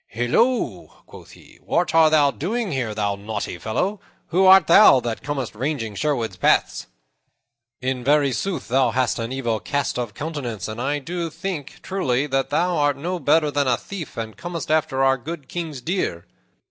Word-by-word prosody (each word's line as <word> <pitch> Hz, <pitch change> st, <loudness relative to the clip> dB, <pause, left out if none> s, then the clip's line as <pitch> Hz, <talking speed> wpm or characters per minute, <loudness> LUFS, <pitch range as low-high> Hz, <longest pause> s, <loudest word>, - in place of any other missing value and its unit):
"Hilloa," 225 Hz, -, -1 dB
quoth -, -, -14 dB
he, -, -, -18 dB
"what 175 Hz, -, 0 dB
art 160 Hz, -1 st, +6 dB
thou 150 Hz, -2 st, +4 dB
doing 210 Hz, -, -3 dB
here, 120 Hz, -6 st, -2 dB
thou 100 Hz, -1 st, 0 dB
naughty 100 Hz, -3 st, -5 dB
fellow? 190 Hz, -, -2 dB, 0.3 s
Who 185 Hz, +3 st, +3 dB
art 190 Hz, 0 st, +8 dB
thou 170 Hz, -5 st, +7 dB
that 120 Hz, -1 st, -4 dB
comest 140 Hz, -4 st, -4 dB
ranging 120 Hz, -2 st, -3 dB
Sherwood's 115 Hz, -6 st, -2 dB
paths? -, -, +1 dB, 0.9 s
In 130 Hz, -1 st, -2 dB
very 145 Hz, +1 st, +3 dB
sooth 195 Hz, +9 st, -3 dB
thou 130 Hz, 0 st, +3 dB
hast 125 Hz, 0 st, 0 dB
an 115 Hz, +1 st, -3 dB
evil 120 Hz, -4 st, -1 dB
cast 140 Hz, 0 st, -2 dB
of 120 Hz, -4 st, -4 dB
countenance, 140 Hz, -, -4 dB
and 110 Hz, +2 st, -5 dB
I 145 Hz, +3 st, 0 dB
do 170 Hz, +4 st, -4 dB
think, 165 Hz, -4 st, -6 dB
truly, 140 Hz, -9 st, 0 dB
that 135 Hz, -2 st, -1 dB
thou 175 Hz, 0 st, +1 dB
art 145 Hz, -2 st, +2 dB
no 175 Hz, +5 st, -3 dB
better 150 Hz, -1 st, +2 dB
than 145 Hz, -1 st, 0 dB
a 125 Hz, -2 st, +2 dB
thief, 185 Hz, -1 st, -8 dB
and 110 Hz, -1 st, -5 dB
comest 170 Hz, -2 st, -5 dB
after 155 Hz, -4 st, +1 dB
our 135 Hz, 0 st, +3 dB
good 150 Hz, +1 st, -7 dB
King's 160 Hz, -6 st, -5 dB
deer." 140 Hz, -, -2 dB
140 Hz, 175 wpm, -22 LUFS, 120-165 Hz, 0.9 s, art